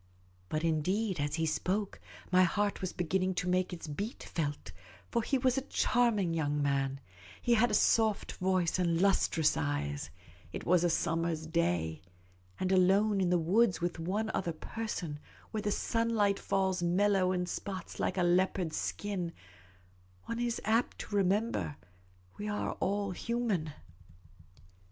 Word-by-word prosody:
But 155 +1 -1
indeed, 180 +5 0
as 145 0 -1
he 165 -1 0
spoke, 185 +6 -1 0.3
my 185 0 +6
heart 205 +3 +1
was 185 -1 -2
beginning 185 +2 0
to 180 - -1
make 180 0 +1
its 175 -2 -6
beat 200 +10 -5
felt; 145 -3 -3 0.4
for 235 - +2
he 270 - +1
was 255 +1 +2
a 270 - -12
charming 220 -8 +2
young 150 -2 0
man; 135 -1 0 0.4
he 240 - +2
had 235 +1 +4
a - - +1
soft 220 -2 +3
voice 185 -1 +1
and 170 -2 +2
lustrous 175 -5 +3
eyes; 70 -1 -2 0.4
it - - -6
was 175 0 +4
a 175 - +3
summer's 165 -1 0
day; 90 - 0 0.6
and 185 0 0
alone 195 +2 +4
in 180 - +2
the 180 - +4
woods 190 +5 +3
with 175 -1 -2
one 205 +6 -1
other 170 -3 -1
per 225 +8 -6
son, 155 -8 -4 0.3
where 215 - -2
the 205 - -1
sunlight 225 -3 +1
falls 190 -2 0
mellow 185 +1 +3
in 180 -1 0
spots 185 0 -6
like - - -1
a 180 - +2
leopard's 175 -1 +1
skin, 190 -5 -3 0.9
one 230 0 -4
is 240 -1 -1
apt 225 +2 +1
to 205 - -5
remember 190 - +1
that 85 - -27 0.5
we 210 - -3
are 210 0 -1
all 200 0 0
human. 210 -6 -1
185 Hz, 155 wpm, -32 LUFS, 165-205 Hz, 0.9 s, my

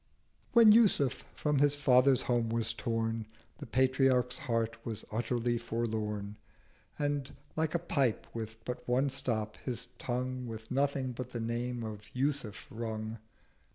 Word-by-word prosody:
When 230 -2 +9
Yusuf 210 - +4
from 150 -2 +1
his 145 0 +4
Father's 130 -2 +4
Home 120 -2 +1
was 115 -1 0
torn, 115 -1 -2 0.3
The - - -7
Patriarch's 130 0 +3
Heart 115 -1 -1
was 110 -2 -5
utterly 120 +1 0
forlorn, 110 -3 -3 0.6
520 145 - -2
And, 145 -1 -1 0.2
like 160 +1 0
a 170 0 -1
Pipe 135 -9 +1
with 110 0 -6
but 125 - -5
one 130 +3 +2
stop, 110 -5 -1
his 125 -1 -4
Tongue 125 0 -2
With 110 -1 -8
nothing 135 -1 +1
but 125 +1 -6
the 120 - -2
name 120 +1 -2
of 110 -2 -5
'Yusuf' 135 -5 -1
rung. 110 -1 -4
120 Hz, 145 wpm, -32 LUFS, 115-135 Hz, 0.6 s, When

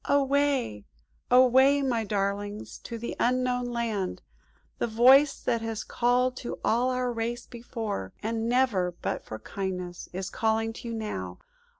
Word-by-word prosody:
"Away, 275 - +1 0.4
away, 260 +3 +6
my 240 -4 0
darlings, 205 0 -3
to 235 - -7
the 235 +1 -5
Unknown 250 0 +1
Land. 230 -6 -2 0.6
The - - +1
voice 260 +6 +6
that 235 -2 0
has 225 -1 -3
called 250 +1 +1
to 240 - -5
all 240 +3 +2
our 250 -1 -1
race 235 +1 -3
before, 225 - -5
and 225 +1 -1
never 220 -9 +2
but - - -2
for 110 - -7
kindness, 180 - -5
is 185 +1 -5
calling 225 0 0
to 235 - -9
you 230 - -3
now! 95 - -4
230 Hz, 140 wpm, -28 LUFS, 205-250 Hz, 0.6 s, away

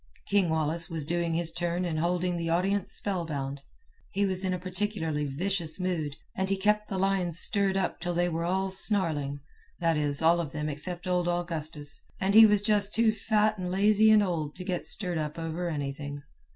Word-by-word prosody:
King 200 -4 +2
Wallace 160 +2 0
was 160 -4 -3
doing 170 +1 -1
his 170 -1 0
turn 175 +1 -2
and 160 -3 -2
holding 180 +1 0
the 165 -1 -3
audience 190 +3 0
spellbound. 145 -8 -2 0.5
He 200 +1 0
was 190 -1 -1
in 185 - -1
a 180 - -1
particularly 180 -5 -3
vicious 170 +4 -1
mood, 165 -6 -2 0.2
and 190 0 -1
he 195 - +1
kept 210 +2 +1
the 195 - -3
lions 185 -3 0
stirred 200 -2 +2
up 190 - -2
till 175 +1 -3
they 175 +1 +1
were 165 -1 -2
all 190 +2 -1
snarling, 160 -8 +2 0.4
that 165 -2 +1
is, 145 0 +3
all 170 +2 +4
of 150 -5 -7
them 150 0 -3
except 175 +5 -4
old 180 -1 0
Augustus, 160 -4 +1 0.2
and 190 +1 0
he 220 +1 +9
was 205 -1 +2
just 210 -1 +2
too 225 -1 +3
fat 215 -1 +1
and 180 -1 -3
lazy 210 +3 +4
and 215 -1 +6
old 160 -6 -3
to 185 - -7
get 180 -2 -3
stirred 180 -5 0
up 150 0 -4
over 165 +2 -3
anything. 145 -1 -5
175 Hz, 195 wpm, -28 LUFS, 160-195 Hz, 0.5 s, he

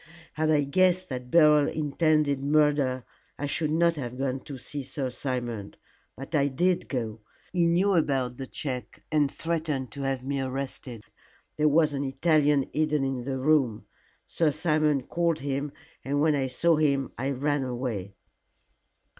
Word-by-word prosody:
Had 155 0 0
I 150 -2 +4
guessed 185 +5 +2
that 125 -1 -5
Beryl 150 -1 +5
intended 150 -2 +1
murder, 145 -3 +2 0.3
I 145 - -3
should 150 +2 -1
not 165 +1 +2
have 125 -3 -5
gone 135 0 -1
to 140 - -7
see 140 +3 -6
Sir 135 -1 -4
Simon. 120 -6 -4 0.4
But 135 +5 -9
I 140 -2 +3
did 175 +7 0
go. 115 -5 -3 0.3
He 175 -2 +3
knew 185 +4 +3
about 135 -7 +1
the 135 - -6
check 125 -6 -6
and 150 -2 +3
threatened 155 -6 -2
to 140 - -7
have 135 -2 -2
me 140 0 -1
arrested. 130 -3 -5 0.5
There 150 0 +3
was 155 0 +3
an 140 0 -2
Italian 145 0 +2
hidden 150 -2 +1
in 130 -2 -3
the 135 -1 -2
room. 130 -5 +2 0.4
Sir 165 -2 +1
Simon 155 -2 +1
called 170 +2 0
him, 140 +1 -2 0.3
and 140 +2 -1
when 155 +1 +3
I 135 -2 0
saw 160 +6 +2
him 140 -3 +1
I 135 +3 -2
ran 145 +1 0
away." 120 -7 -4
140 Hz, 160 wpm, -27 LUFS, 130-155 Hz, 0.5 s, Beryl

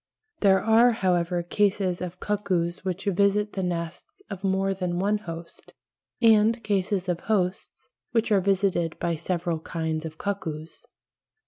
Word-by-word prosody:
There 195 -2 +4
are, 230 +2 +5
however, 180 -4 0
cases 190 -1 0
of 180 0 -5
cuckoos 185 -5 -1
which 185 0 -3
visit 200 +2 +2
the 195 - -2
nests 170 -2 -4
of 195 -1 -6
more 195 0 +1
than 180 -2 -2
one 205 +3 +1
host, 165 -3 -10 0.4
and 225 0 +4
cases 195 -1 0
of 175 -2 -1
hosts 190 -3 -2 0.2
which 230 -1 +1
are 200 -2 +4
visited 190 -4 +1
by 170 -1 -1
several 170 0 -2
kinds 160 -1 -3
of 160 -1 -7
cuckoos. 165 -6 -5
190 Hz, 140 wpm, -26 LUFS, 170-205 Hz, 0.4 s, are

